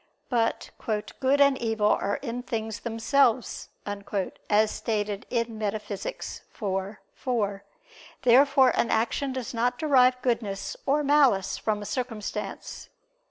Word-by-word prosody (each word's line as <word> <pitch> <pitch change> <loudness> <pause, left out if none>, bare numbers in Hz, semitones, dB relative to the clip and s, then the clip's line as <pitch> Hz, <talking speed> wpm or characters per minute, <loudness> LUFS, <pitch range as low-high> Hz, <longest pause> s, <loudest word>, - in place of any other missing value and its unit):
But 230 -2 0 0.5
"good 275 +1 +3
and 280 -1 +5
evil 220 -3 +1
are 200 - +1
in 245 -2 -3
things 220 -3 -4
themselves," 235 +1 +1 0.2
as 205 0 -4 0.5
is 215 +1 +4
stated 210 -3 -2
in 230 -2 -2
Metaph. 210 0 -3 0.6
vi, 195 -1 -3 0.2
4. 205 -6 -1 0.6
Therefore 265 +2 +6
an - - +1
action 240 +5 0
does 255 -2 -4
not 245 +2 0
derive 255 -5 +4
goodness 220 -6 -1
or 295 +2 +3
malice 275 -9 +3
from 210 -1 -1
a - - -7
circumstance. 220 -1 -5
230 Hz, 120 wpm, -27 LUFS, 210-260 Hz, 0.6 s, Therefore